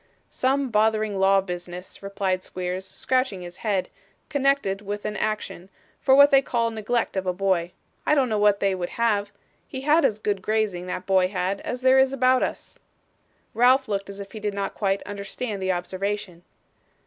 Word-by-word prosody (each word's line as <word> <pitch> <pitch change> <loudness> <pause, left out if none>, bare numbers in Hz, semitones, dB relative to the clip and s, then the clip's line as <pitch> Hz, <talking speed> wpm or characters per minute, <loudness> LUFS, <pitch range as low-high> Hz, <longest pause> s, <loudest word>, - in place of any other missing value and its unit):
'Some 270 +1 0
bothering 215 -2 +1
law 195 0 +4
business,' 180 0 -8
replied 195 -2 -2
Squeers, 185 +1 -4
scratching 255 -8 -1
his 175 0 -10
head, 200 -4 -1 0.4
'connected 275 -9 +1
with 205 0 -5
an 210 0 -3
action, 210 -4 -3 0.3
for 265 -1 +4
what 285 +1 +7
they 275 -1 +6
call 235 -3 0
neglect 225 +1 -1
of 190 -1 -2
a 180 - +1
boy. 180 -2 0 0.3
I 300 - +3
don't 270 -3 +3
know 215 -3 0
what 205 -1 +3
they 195 -1 +2
would 180 -2 -3
have. 205 -3 +1 0.4
He 260 - -6
had 300 +4 +3
as 230 -6 +2
good 205 -2 -2
grazing, 205 -4 -1
that 180 - -4
boy 190 -1 +3
had, 185 +1 -2
as 250 0 -5
there 260 +1 +5
is 265 0 +3
about 255 -1 +3
us.' - - -4 0.7
Ralph 255 +3 +4
looked 200 -1 -3
as 200 0 -8
if 200 -1 -8
he 220 - -7
did 210 -1 -3
not 200 -1 -3
quite 195 -1 -1
understand 205 +1 -5
the 190 0 +1
observation. 185 0 -3
205 Hz, 185 wpm, -24 LUFS, 190-240 Hz, 0.7 s, what